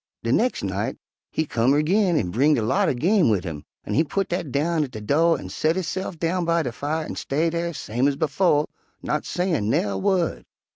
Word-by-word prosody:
"De 115 Hz, -, 0 dB
nex' 245 Hz, -, +1 dB
night -, -, -2 dB, 0.3 s
he 160 Hz, -, -1 dB
come 125 Hz, 0 st, +2 dB
erg'in 175 Hz, +5 st, +2 dB
and 90 Hz, -8 st, -1 dB
bringed 145 Hz, +7 st, +3 dB
a 115 Hz, -, 0 dB
lot 185 Hz, -, +2 dB
er -, -, +1 dB
game 180 Hz, -, +3 dB
wid 100 Hz, -5 st, +1 dB
'im, 75 Hz, -3 st, -6 dB, 0.2 s
an' -, -, -4 dB
he 160 Hz, -, +4 dB
putt 195 Hz, +5 st, -2 dB
dat 175 Hz, -5 st, -3 dB
down 155 Hz, +4 st, +1 dB
at 140 Hz, -, -4 dB
de 110 Hz, -, -8 dB
do' 160 Hz, +10 st, +3 dB
an' -, -, -7 dB
set 155 Hz, -, 0 dB
hisse'f 185 Hz, 0 st, -3 dB
down 175 Hz, +3 st, 0 dB
by 170 Hz, 0 st, +1 dB
de 125 Hz, -, -3 dB
fire 155 Hz, +6 st, -3 dB
an' -, -, -6 dB
stay 160 Hz, +4 st, 0 dB
dar, 170 Hz, 0 st, -2 dB
same 125 Hz, -3 st, -1 dB
ez 140 Hz, -, +1 dB
befo', 150 Hz, +1 st, +2 dB, 0.4 s
not 150 Hz, -, -1 dB
sayin' 170 Hz, -, 0 dB
nair' 100 Hz, -3 st, +1 dB
wu'd. 175 Hz, -, 0 dB
155 Hz, 220 wpm, -24 LUFS, 125-170 Hz, 0.4 s, he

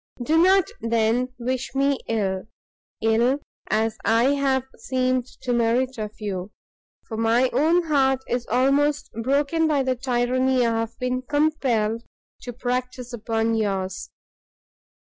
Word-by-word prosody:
Do 310 Hz, +6 st, +1 dB
not, 380 Hz, 0 st, +5 dB, 0.2 s
then, 230 Hz, +2 st, +1 dB
wish 255 Hz, +2 st, -3 dB
me 275 Hz, 0 st, +2 dB
ill, 195 Hz, -3 st, -1 dB, 0.6 s
ill 230 Hz, +4 st, +3 dB, 0.3 s
as 220 Hz, +1 st, 0 dB
I 230 Hz, +4 st, +3 dB
have 270 Hz, -2 st, +1 dB
seemed 255 Hz, +1 st, -1 dB, 0.2 s
to 250 Hz, -1 st, 0 dB
merit 240 Hz, +2 st, +1 dB
of 210 Hz, 0 st, -5 dB
you, 195 Hz, -3 st, -4 dB, 0.6 s
for 220 Hz, -, -5 dB
my 230 Hz, +3 st, +2 dB
own 320 Hz, +7 st, +3 dB
heart 270 Hz, -4 st, +2 dB
is 245 Hz, -1 st, -2 dB
almost 275 Hz, +4 st, +2 dB
broken 285 Hz, +6 st, +1 dB
by 290 Hz, -3 st, +2 dB
the 260 Hz, -1 st, 0 dB
tyranny 255 Hz, 0 st, +1 dB
I 230 Hz, -, +2 dB
have 230 Hz, 0 st, -4 dB
been 250 Hz, 0 st, -1 dB
compelled 255 Hz, -6 st, 0 dB, 0.4 s
to 245 Hz, -, -6 dB
practise 250 Hz, 0 st, -3 dB
upon 225 Hz, 0 st, -1 dB
yours. 195 Hz, -3 st, -2 dB
250 Hz, 130 wpm, -24 LUFS, 225-265 Hz, 0.6 s, not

